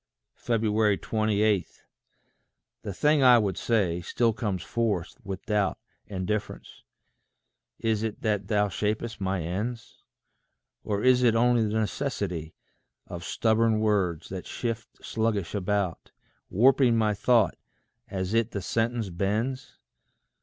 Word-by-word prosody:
28. 110 -2 +1 1.0
The 100 - -5
thing 150 +9 +2
I 125 -2 +8
would 100 -5 0
say, 95 -5 0
still 115 +6 +1
comes 100 -6 -3
forth 105 -7 -1
with 95 0 -6
doubt 105 -4 +1 0.3
And 95 -2 -4
difference: 105 +1 -4 1.0
is 110 -2 0
it 110 -1 -4
that 105 -3 0
thou 105 -1 +2
shap'st 105 +2 -3
my 95 -2 -1
ends? 110 +8 -5 0.8
Or 105 -1 -2
is 125 -1 +5
it 120 -2 +4
only 120 -1 +3
the 110 +1 0
necessity 100 - -3 0.5
Of 85 -1 -7
stubborn 110 +1 +2
words, 95 -7 0
that 95 -1 -6
shift 120 -1 -5
sluggish 110 -5 -1
about, 100 -2 -1 0.4
Warping 125 +2 +4
my 110 -1 +2
thought 110 -2 +3 0.5
as 95 +1 -3
it 115 0 +2
the 100 - -4
sentence 115 +1 -1
bends? 115 - -2
105 Hz, 120 wpm, -27 LUFS, 95-115 Hz, 1.0 s, I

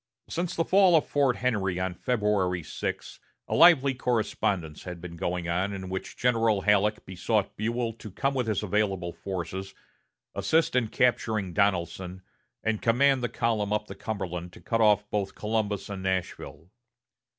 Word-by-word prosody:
Since 175 0 -3
the 165 - +1
fall 190 -2 +5
of 155 - +4
Fort 140 -4 +2
Henry 100 -7 0
on 95 -1 -1
February 100 -5 0
6, - - -5 0.3
a - - -3
lively 145 -6 +6
correspondence 100 - -1
had 90 -2 -7
been 85 0 -8
going 85 +1 -2
on, 90 +4 0
in 95 -1 -6
which 95 0 -5
General 115 -4 +2
Halleck 105 +1 +2
besought 95 +2 -1
Buell 115 +2 -1
to 110 -1 -10
come 135 +8 -1
with 125 -3 -1
his 110 -1 0
available 95 -4 0
forces, 95 +1 -5 0.6
assist 160 -4 +1
in 125 -3 +2
capturing 110 -5 +1
Donelson, 90 0 -1 0.4
and 110 -1 0
command 130 +3 +3
the 120 - -1
column 110 -3 -1
up 105 0 0
the - - -8
Cumberland 90 -5 -5
to - - -13
cut 115 -1 -1
off 105 -1 +4
both 100 -2 -2
Columbus 105 -2 -2
and 100 -2 -6
Nashville. 95 -2 -4
105 Hz, 160 wpm, -27 LUFS, 95-115 Hz, 0.6 s, lively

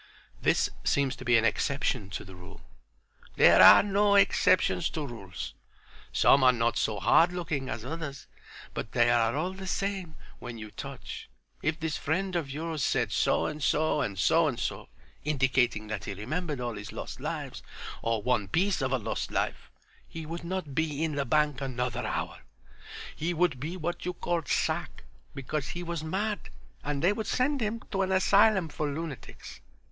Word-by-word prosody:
"This - - +2
seems 140 -2 +1
to 130 - -8
be 120 -1 +5
an 115 - +2
exception 125 -3 0
to 100 - -5
the 95 - -11
rule." 90 -1 -12 0.7
"There - - +7
are - - +10
no 205 0 +3
exceptions 185 - +3
to 155 -2 -4
rules. 100 - -7 0.6
Some 135 - +5
are 130 - +8
not 115 -1 0
so 105 -2 0
hard 170 +2 +5
looking 155 -7 -3
as 110 +1 -5
others, 150 -2 -6 0.5
but 115 - -5
they 120 -1 +4
are 115 0 +2
all 175 +5 -1
the 190 0 -8
same 190 -4 -2 0.2
when 120 -2 -7
you 110 -1 -8
touch. - - -8 0.3
If 160 +1 -1
this 160 -2 -2
friend 185 +4 -1
of 160 -5 -1
yours 155 +1 -3
said - - +1
so - - +2
and 150 0 -4
so 150 +2 +2
and 100 -7 -2
so 160 - +4
and 130 -5 -2
so, - - -4 0.3
indicating 130 -6 +1
that 105 -2 -4
he 100 - -4
remembered 150 - -3
all 120 -1 -3
his 105 +1 -7
lost - - -7
lives, - - -5 0.4
or 115 -2 -1
one 120 -5 +1
piece 185 - +1
of 130 -1 0
a 130 - +2
lost 110 - -3
life, - - -2 0.4
he 160 -1 -7
would 170 +2 -6
not 175 -4 -4
be 155 0 -1
in 160 -2 -1
the 140 -1 -1
bank 150 +1 +1
another 125 -2 -2
hour. - - -3 0.8
He 170 +3 -2
would 165 -6 +1
be 160 +7 -4
what 175 0 -3
you 180 - -2
called 170 -3 -2
sack - - -1 0.3
because 135 +1 -3
he 175 0 -5
was 170 -2 -4
mad, 205 +6 -2 0.3
and 145 -1 -2
they 185 +4 +4
would 215 0 -4
send 270 +1 +1
him 225 +1 -2
to 195 -2 0
an 190 0 0
asylum 190 0 +4
for 150 -1 -3
lunatics. 150 -5 -7
150 Hz, 180 wpm, -29 LUFS, 125-175 Hz, 0.8 s, are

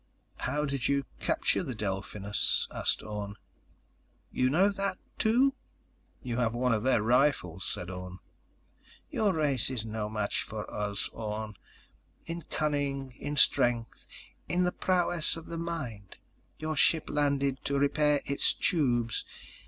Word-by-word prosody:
"How 150 +1 -1
did 140 -3 -1
you 140 -1 +1
capture - - +1
the 135 -9 -4
Delphinus?" 100 0 -1
asked - - 0
Orne. 105 -1 -5 1.0
"You 130 0 +2
know 180 +9 +4
that, 200 0 -1 0.2
too?" 250 +5 +4 0.7
"You 120 -3 -3
have 120 -2 +1
one 125 0 +2
of 110 - +1
their 125 -3 +3
rifles," 115 - +2
said 90 +1 -5
Orne. 90 0 -7 0.9
"Your 210 -2 +2
race 145 -8 +2
is 120 -4 -2
no 110 -1 -3
match 105 -2 -1
for 105 0 -5
us, 105 -1 -1
Orne... 110 -1 -5 0.7
in 170 +1 -4
cunning, 140 -4 -1
in 145 +1 -3
strength, 120 -4 +3 0.4
in 180 +1 +2
the 180 - +2
prowess 175 -4 +1
of 165 - -9
the 165 - -5
mind. 125 - -5 0.4
Your 155 0 -3
ship 160 +2 +3
landed 140 -2 +1
to 140 - +1
repair 145 +1 +3
its 140 - +2
tubes. 120 -8 +1
130 Hz, 135 wpm, -30 LUFS, 110-155 Hz, 1.0 s, know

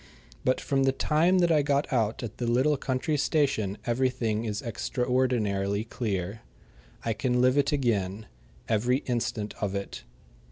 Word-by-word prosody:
But 130 - +2
from 135 -1 0
the 135 - +4
time 160 +7 +2
that 175 -2 +3
I 155 -2 +4
got 140 0 0
out 115 -1 0
at 115 -2 -6
the 120 - -1
little 130 +6 +3
country 140 +3 -1
station 130 - +1
everything 120 -3 0
is 105 -1 -3
extraordinarily 115 -5 0
clear. 105 -3 -3 0.6
I 115 - +1
can 125 +2 0
live 130 +1 +4
it 140 -1 +2
again 110 -7 0 0.4
every 120 +4 +1
instant 120 -4 -2
of 100 -2 -1
it. 100 0 -5
125 Hz, 150 wpm, -28 LUFS, 105-135 Hz, 0.6 s, the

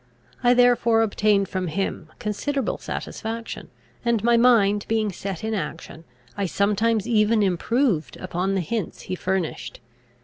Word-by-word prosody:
I 245 0 +5
therefore 240 -2 +4
obtained 205 -2 +2
from 185 -1 -3
him 165 -2 -3
considerable 245 +5 -2
satisfaction; 225 +1 -6 0.3
and, 235 -3 +1
my 235 0 +4
mind 215 -4 +4
being 220 -2 0
set 190 0 -6
in 220 0 -2
action, 165 -3 -5 0.3
I 200 - -1
sometimes 210 +3 +1
even 215 -1 +3
improved 195 - 0
upon 185 +1 -2
the 190 - +1
hints 210 +1 -4
he - - -6
furnished. 180 -9 -3
210 Hz, 135 wpm, -24 LUFS, 190-230 Hz, 0.3 s, I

